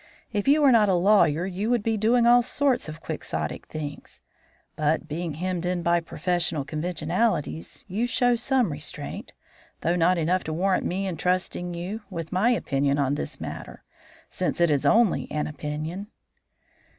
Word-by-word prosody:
If 205 +2 -1
you 295 +2 +5
were 275 - +7
not 215 -4 +5
a 190 - +4
lawyer 180 -3 +4
you 195 +4 -2
would 240 -3 +2
be 225 0 +1
doing 230 +3 +3
all 240 +1 +7
sorts 260 - 0
of 155 +1 -9
quixotic - - -4
things; 145 -2 -7 0.6
but, 155 +1 0
being 160 0 -4
hemmed 180 +1 -2
in 180 -1 -1
by 170 +1 +3
professional 170 -3 -1
conventionalities, 155 - -2
you 210 +5 -1
show 245 0 +3
some 245 - +1
restraint, 145 0 -6 0.5
though 170 +2 +1
not 180 +1 +3
enough 175 +3 +1
to 155 - -3
warrant 185 +3 +1
me 190 +2 -2
in 180 -4 -3
trusting 180 0 -1
you 185 +6 -5
with 165 -1 -6
my 190 +6 +3
opinion 140 - +1
on 140 -1 +1
this 145 - -4
matter - - -7 0.4
since - - -2
it 170 -2 +4
is 145 -2 +2
only 225 -4 +3
an 150 0 -1
opinion." 155 +6 -5
180 Hz, 165 wpm, -25 LUFS, 155-210 Hz, 0.6 s, were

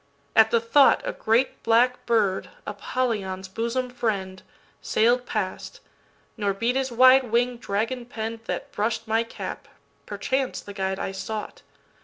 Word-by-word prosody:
At 220 0 +7
the 235 - +3
thought,A 285 - +4
great 230 +4 +1
black 240 +2 +2
bird, 210 -5 +1 0.2
Apollyon's 205 -3 -2
bosom 235 +5 -2
friend, 195 -6 -2 0.4
Sail'd 240 +3 +2
past, 200 -4 -4 0.6
nor 205 -3 -1
beat 235 +5 0
his 265 -1 0
wide 255 +2 +6
wing 240 +1 +1
dragon 230 +3 -2
penn'dThat 225 -1 -5
brush'd 220 +2 -2
my 225 +1 +2
cap—perchance 260 +3 -5
the 205 - -10
guide 190 -1 -2
I - - -3
sought. 210 +2 -6
225 Hz, 125 wpm, -25 LUFS, 205-250 Hz, 0.6 s, At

